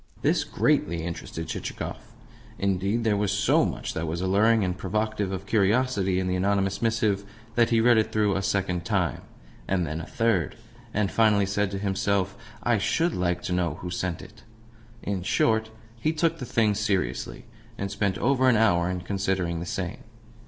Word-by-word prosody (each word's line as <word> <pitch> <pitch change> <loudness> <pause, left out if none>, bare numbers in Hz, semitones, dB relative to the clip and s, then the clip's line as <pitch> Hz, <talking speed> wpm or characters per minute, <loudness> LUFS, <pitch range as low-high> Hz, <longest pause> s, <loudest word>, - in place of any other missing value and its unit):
This - - +3
greatly 85 0 +1
interested 80 -1 -5
Chichikov. - - -4 0.6
Indeed, 100 +4 0
there 110 -2 +2
was 100 -1 0
so - - +3
much - - -4
that 80 +1 -3
was 85 +2 -2
alluring 105 +4 +3
and 90 -1 -1
provocative 105 +1 -2
of 95 0 -4
curiosity 100 -2 +2
in 95 - -1
the 90 0 0
anonymous 95 +1 0
missive 110 -3 +1 0.3
that 120 0 +3
he 115 - +3
read 120 0 +5
it 110 - 0
through 105 -2 +2
a 95 - 0
second 95 -3 -1
time, 90 -3 0 0.5
and 95 -2 +1
then 80 +1 -4
a - - -8
third, 115 -8 0 0.4
and 100 -2 0
finally 105 -3 +4
said 100 +1 0
to 100 - -4
himself: 100 0 0 0.3
"I 120 -3 +2
SHOULD 165 - +1
like 90 -1 -1
to 90 - -2
know 85 -4 0
who 90 +2 -7
sent 90 0 -3
it!" 110 - -14 0.6
In 100 -2 -2
short, 110 +4 +1 0.3
he 155 +7 +1
took 165 +1 0
the 125 - -4
thing 110 -2 +2
seriously, 100 -2 -2 0.3
and 100 0 -3
spent 100 -1 0
over 130 0 +3
an 120 - +4
hour 90 -6 +3
in 90 -1 -3
considering 95 -2 -1
the 85 - -5
same. 95 -5 -3
100 Hz, 180 wpm, -26 LUFS, 90-110 Hz, 0.6 s, read